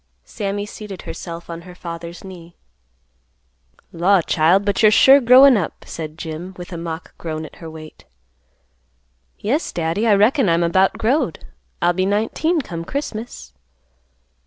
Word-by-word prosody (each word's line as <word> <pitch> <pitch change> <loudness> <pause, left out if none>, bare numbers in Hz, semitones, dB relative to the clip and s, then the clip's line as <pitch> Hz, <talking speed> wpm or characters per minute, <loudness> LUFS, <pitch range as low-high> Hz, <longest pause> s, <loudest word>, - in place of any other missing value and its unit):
Sammy 205 0 -4
seated 205 -2 -9
herself 170 -1 -8
on 170 0 -7
her 180 +1 -13
father's 170 -1 -8
knee. 175 -3 -12 1.4
"Law', 185 +3 +3
child, 170 +7 +2
but 200 0 0
you're 215 - +7
sure 270 +6 +7
growin' 255 +1 +7
up," 180 - -4
said 155 -1 -7
Jim, 170 +4 -7
with 175 0 -9
a - - -4
mock 165 0 -7
groan 155 -1 -5
at - - -13
her 165 - -9
weight. 155 -1 -12 1.3
"Yes, 270 +11 -1
Daddy, 170 +7 -1
I 210 - +5
reckon 215 - +3
I'm 170 +1 +2
about 190 +3 +3
growed; 255 +8 0 0.4
I'll 175 +1 +3
be 185 +1 0
nineteen 225 - 0
come 170 -9 -6
Christmas." 220 - -6
185 Hz, 145 wpm, -20 LUFS, 165-215 Hz, 1.4 s, you're